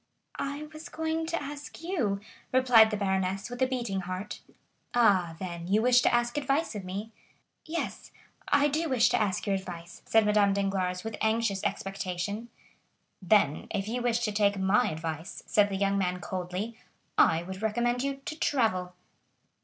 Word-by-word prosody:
"I 285 Hz, +2 st, -3 dB
was 310 Hz, +2 st, -9 dB
going 320 Hz, 0 st, -2 dB
to 335 Hz, 0 st, -1 dB
ask 290 Hz, +2 st, -8 dB
you," 245 Hz, -, -1 dB, 0.3 s
replied 250 Hz, -4 st, +6 dB
the 210 Hz, -, -2 dB
baroness 190 Hz, +1 st, -1 dB
with 245 Hz, +1 st, -6 dB
a 260 Hz, -, +4 dB
beating 240 Hz, -7 st, -2 dB
heart. 185 Hz, +2 st, -5 dB, 0.5 s
"Ah, 190 Hz, -8 st, +4 dB
then, 170 Hz, -1 st, -6 dB
you 210 Hz, +4 st, +3 dB
wish 245 Hz, 0 st, +6 dB
to -, -, +3 dB
ask 240 Hz, +3 st, +1 dB
advice 280 Hz, +3 st, 0 dB
of 205 Hz, -2 st, -5 dB
me?" 200 Hz, +4 st, -5 dB, 0.5 s
"Yes; 335 Hz, +2 st, -4 dB, 0.4 s
I 285 Hz, 0 st, +4 dB
do 310 Hz, +3 st, -1 dB
wish 245 Hz, -2 st, +4 dB
to -, -, +2 dB
ask 195 Hz, -4 st, 0 dB
your 200 Hz, -, +1 dB
advice," 175 Hz, -3 st, -7 dB
said 220 Hz, -1 st, +4 dB
Madame 210 Hz, -1 st, +4 dB
Danglars 190 Hz, -2 st, -1 dB
with 220 Hz, -1 st, -5 dB
anxious 220 Hz, -3 st, +1 dB
expectation. 195 Hz, +3 st, -3 dB, 0.7 s
"Then 185 Hz, -6 st, +3 dB
if 200 Hz, -2 st, -2 dB
you 245 Hz, +3 st, -2 dB
wish 240 Hz, -1 st, +1 dB
to 220 Hz, -3 st, 0 dB
take 205 Hz, -1 st, +2 dB
my 195 Hz, +6 st, +3 dB
advice," 160 Hz, +1 st, -5 dB
said 205 Hz, -1 st, +3 dB
the 195 Hz, -, -3 dB
young 200 Hz, 0 st, +1 dB
man 180 Hz, -1 st, 0 dB
coldly, 185 Hz, +5 st, -4 dB, 0.4 s
"I 165 Hz, +1 st, +4 dB
would 190 Hz, +2 st, -7 dB
recommend 240 Hz, +3 st, +1 dB
you 275 Hz, 0 st, -2 dB
to 310 Hz, -, -5 dB
travel." 185 Hz, -12 st, +1 dB
210 Hz, 170 wpm, -29 LUFS, 190-245 Hz, 0.7 s, replied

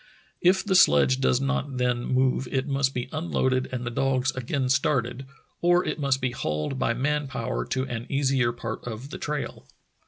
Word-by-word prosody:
If 190 Hz, +2 st, +4 dB
the 200 Hz, -, +1 dB
sledge 130 Hz, -, +5 dB
does 125 Hz, -1 st, +3 dB
not 140 Hz, 0 st, -2 dB
then 125 Hz, -1 st, 0 dB
move 130 Hz, 0 st, +1 dB
it 135 Hz, +1 st, -1 dB
must 135 Hz, -1 st, 0 dB
be 125 Hz, -, -2 dB
unloaded 130 Hz, -5 st, 0 dB
and 125 Hz, -1 st, -3 dB
the 120 Hz, -, -3 dB
dogs 135 Hz, +1 st, +1 dB
again 130 Hz, +1 st, -2 dB
started, 135 Hz, -2 st, 0 dB, 0.3 s
or 175 Hz, +1 st, +4 dB
it -, -, -2 dB
must 140 Hz, -2 st, +1 dB
be 130 Hz, -1 st, 0 dB
hauled 75 Hz, -, -3 dB
by 115 Hz, -, +1 dB
man 150 Hz, +3 st, 0 dB
power 125 Hz, -2 st, -3 dB
to 130 Hz, -, -1 dB
an 120 Hz, -2 st, -5 dB
easier 135 Hz, -3 st, +2 dB
part 115 Hz, -1 st, -6 dB
of 120 Hz, +5 st, -6 dB
the -, -, -6 dB
trail. 150 Hz, -1 st, -4 dB
130 Hz, 185 wpm, -26 LUFS, 125-140 Hz, 0.3 s, sledge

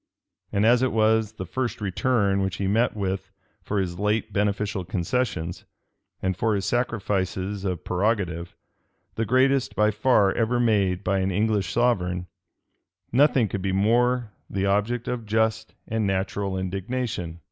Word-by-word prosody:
And 100 Hz, +2 st, +2 dB
as 120 Hz, +2 st, +5 dB
it 130 Hz, -, +2 dB
was 110 Hz, 0 st, +2 dB
the 95 Hz, -, -6 dB
first 130 Hz, +6 st, -3 dB
return 100 Hz, 0 st, +1 dB
which 95 Hz, -1 st, -1 dB
he 100 Hz, -, -3 dB
met 110 Hz, +5 st, +2 dB
with 95 Hz, -2 st, -3 dB, 0.3 s
for 105 Hz, -, -2 dB
his 90 Hz, -2 st, -3 dB
late 105 Hz, +1 st, 0 dB
beneficial 100 Hz, -1 st, 0 dB
concessions, 90 Hz, -1 st, -2 dB, 0.6 s
and 95 Hz, 0 st, 0 dB
for 110 Hz, +3 st, +1 dB
his 100 Hz, -, -2 dB
sacrifices 100 Hz, -4 st, -1 dB
of 90 Hz, -4 st, -2 dB
prerogative, 90 Hz, -3 st, -1 dB, 0.6 s
the 115 Hz, -, -1 dB
greatest 130 Hz, +2 st, +2 dB
by 105 Hz, 0 st, +3 dB
far 105 Hz, -2 st, +3 dB
ever 120 Hz, +1 st, +1 dB
made 100 Hz, -5 st, +2 dB
by 95 Hz, +1 st, +1 dB
an 95 Hz, 0 st, 0 dB
English 105 Hz, -2 st, 0 dB
sovereign, 90 Hz, -7 st, +1 dB, 0.9 s
nothing 130 Hz, -2 st, +4 dB
could 95 Hz, 0 st, -4 dB
be 95 Hz, 0 st, -1 dB
more 120 Hz, +3 st, +2 dB, 0.2 s
the 100 Hz, 0 st, -1 dB
object 105 Hz, +5 st, 0 dB
of 120 Hz, -3 st, -3 dB
just 110 Hz, +1 st, 0 dB
and 110 Hz, -2 st, 0 dB
natural 95 Hz, 0 st, -1 dB
indignation. 95 Hz, -2 st, -3 dB
105 Hz, 145 wpm, -25 LUFS, 95-115 Hz, 0.9 s, as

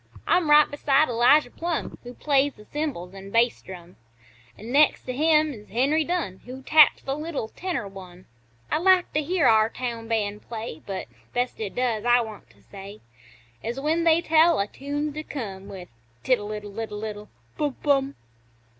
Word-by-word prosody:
I'm 345 Hz, -4 st, +2 dB
right 295 Hz, 0 st, +7 dB
beside 290 Hz, 0 st, +2 dB
Elijah 245 Hz, +3 st, +4 dB
Plumb, 340 Hz, 0 st, -4 dB
Who 245 Hz, 0 st, -10 dB
plays 285 Hz, -1 st, +1 dB
th' 210 Hz, -, -16 dB
cymbals 280 Hz, -, -4 dB
an' 195 Hz, 0 st, -10 dB
bass 230 Hz, +3 st, +2 dB
drum; 180 Hz, -1 st, -12 dB, 0.6 s
An' 225 Hz, +3 st, -9 dB
next 295 Hz, +3 st, +4 dB
to 255 Hz, -, -5 dB
him 305 Hz, +2 st, +3 dB
is 210 Hz, -3 st, -13 dB
Henry 275 Hz, +9 st, +1 dB
Dunn, 320 Hz, -, -3 dB
Who 260 Hz, +2 st, -9 dB
taps 310 Hz, +2 st, +5 dB
the 270 Hz, -, -2 dB
little 300 Hz, -7 st, -4 dB
tenor 350 Hz, -, -4 dB
one. 185 Hz, -2 st, -12 dB, 0.5 s
I -, -, +2 dB
like 370 Hz, 0 st, +3 dB
to 305 Hz, -, +1 dB
hear 345 Hz, +4 st, 0 dB
our 220 Hz, 0 st, +5 dB
town 235 Hz, -2 st, -5 dB
band 210 Hz, -2 st, -2 dB
play, 225 Hz, -8 st, -7 dB
But, 195 Hz, -2 st, -4 dB, 0.3 s
best 245 Hz, +1 st, -2 dB
it 210 Hz, -3 st, -5 dB
does, 240 Hz, -4 st, -1 dB
I 245 Hz, 0 st, +4 dB
want 220 Hz, -3 st, -9 dB
to -, -, -25 dB
say, 200 Hz, +1 st, -11 dB, 0.6 s
Is 235 Hz, +4 st, -4 dB
when 315 Hz, +4 st, 0 dB
they 330 Hz, 0 st, +4 dB
tell 325 Hz, 0 st, +4 dB
a 200 Hz, -, +1 dB
tune's 290 Hz, +6 st, -4 dB
to 305 Hz, -, -5 dB
come 200 Hz, -11 st, -7 dB
With 185 Hz, -2 st, -9 dB, 0.3 s
"Tiddle 215 Hz, -5 st, 0 dB
iddle 210 Hz, 0 st, -7 dB
iddle 215 Hz, -1 st, -5 dB
iddle 210 Hz, -1 st, -6 dB, 0.3 s
Bum 290 Hz, -3 st, -2 dB
Bum!" 280 Hz, -1 st, +1 dB
245 Hz, 180 wpm, -25 LUFS, 210-300 Hz, 0.6 s, right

